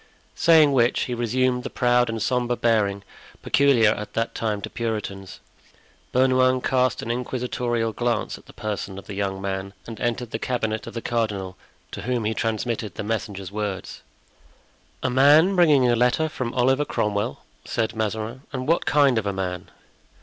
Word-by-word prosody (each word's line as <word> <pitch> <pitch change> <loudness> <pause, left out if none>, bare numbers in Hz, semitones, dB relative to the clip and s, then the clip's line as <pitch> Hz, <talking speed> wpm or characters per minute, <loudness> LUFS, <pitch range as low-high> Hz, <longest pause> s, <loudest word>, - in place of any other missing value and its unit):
Saying 160 -3 +5
which, 120 -1 +3
he 125 - -2
resumed 125 +2 0
the - - -5
proud 125 -1 +2
and 115 0 -3
sombre 120 +1 0
bearing 105 -4 +1 0.4
peculiar 130 -6 +4
at 105 0 -5
that 115 0 -1
time 105 -2 -2
to - - -4
Puritans. 105 -5 -4 0.7
Bernouin 130 0 +3
cast 130 -1 +1
an 115 - -2
inquisitorial 120 -2 -2
glance 120 0 -1
at - - -16
the - - -12
person 105 -2 -5
of 100 - -9
the 105 - -7
young 95 -1 -2
man 95 0 -4
and 115 -2 -8
entered 120 0 -2
the 110 - -3
cabinet 110 -4 -2
of - - -8
the 115 - -4
cardinal, 105 -6 -2 0.4
to - - -6
whom 120 -3 -1
he 110 - 0
transmitted 110 -2 -2
the - - -4
messenger's 100 -3 -4
words. 105 -2 -4 1.0
"A 130 - +1
man 150 +8 +5
bringing 150 -8 +5
a 120 - +3
letter 125 +6 +2
from 130 -6 -4
Oliver 130 +3 +3
Cromwell?" 105 -7 -2 0.2
said 115 -1 -2
Mazarin. 110 +3 -3
"And 130 -2 -4
what 165 +2 +1
kind 140 -5 +4
of 105 - -4
a 100 - -1
man?" 90 -2 -4
115 Hz, 170 wpm, -24 LUFS, 105-125 Hz, 1.0 s, Saying